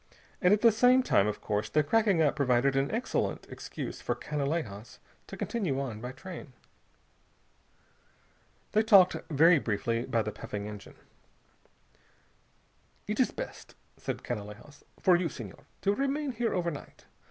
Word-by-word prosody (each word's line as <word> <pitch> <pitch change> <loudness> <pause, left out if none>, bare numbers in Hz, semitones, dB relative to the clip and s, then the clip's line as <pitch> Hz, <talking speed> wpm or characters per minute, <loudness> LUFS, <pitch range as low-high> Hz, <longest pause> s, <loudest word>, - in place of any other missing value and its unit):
And 180 -2 +5
at 210 0 +4
the 230 - +7
same 250 +4 +5
time, 100 - +3
of 105 - -3
course, 105 0 -2
the 150 - +3
cracking 200 -1 +3
up 150 - +2
provided 135 -1 +2
an 135 +1 +1
excellent 230 +4 -2
excuse - - -6
for - - -1
Canalejas 140 -8 -3 0.3
to - - -8
continue 180 - -1
on 120 -6 -4
by 125 +1 -5
train. 155 -1 -9 2.2
They 215 - +4
talked 195 -4 +6
very 160 +2 +5
briefly 115 +1 -1
by 115 -4 +1
the 105 - -3
puffing 100 0 -6
engine. 105 -1 -9 2.1
"It - - -3
is - - +4
best," - - -8 0.2
said - - -5
Canalejas, 110 +5 -7 0.2
"for 185 - +5
you, 175 -1 0
Senhor, 115 -8 -10 0.2
to 200 - +2
remain 275 +4 -1
here 240 -1 -1
overnight. 170 -5 -4
150 Hz, 140 wpm, -29 LUFS, 120-200 Hz, 2.2 s, the